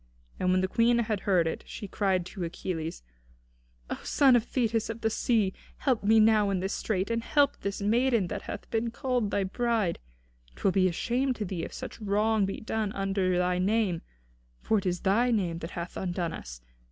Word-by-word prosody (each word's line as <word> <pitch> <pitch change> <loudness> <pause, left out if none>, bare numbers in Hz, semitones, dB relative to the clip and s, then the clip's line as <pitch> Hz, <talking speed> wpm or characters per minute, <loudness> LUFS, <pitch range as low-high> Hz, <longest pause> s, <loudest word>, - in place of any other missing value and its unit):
And 185 - +1
when 185 0 +3
the 190 - +1
Queen 235 +4 +3
had 220 -3 0
heard 180 -4 +4
it, 160 - -3
she 205 - -7
cried 190 -3 0
to 180 +1 -6
Achilles: 165 - -4 0.8
"O - - -4
son 270 -3 +5
of 235 - +3
Thetis 230 -4 0
of 225 0 -5
the 220 - +1
sea! 215 -5 +1 0.2
help 255 -7 0
me 220 +2 +5
now 215 -2 +5
in 195 -2 0
this 190 +2 -2
strait, 200 0 -1
and 230 0 0
help 285 +4 +2
this 200 0 -3
maiden 235 0 +3
that 200 +3 -4
hath 205 - -7
been 230 0 0
called 245 -2 -1
thy 200 - 0
bride! 220 -2 0 0.6
'Twill 195 - +1
be 185 0 +3
a - - 0
shame 250 +8 0
to 215 - -3
thee 175 -3 -4
if - - -5
such - - -8
wrong 210 0 +2
be 195 - -4
done 220 -1 -2
under 195 -2 0
thy 180 0 +1
name; 195 -3 +1 0.6
for 220 - +1
it 195 - -4
is 180 -1 -1
thy 225 +6 +3
name 180 -8 0
that 165 - -6
hath 170 +1 -5
undone 175 -3 -2
us. - - -8
205 Hz, 200 wpm, -28 LUFS, 185-225 Hz, 0.8 s, son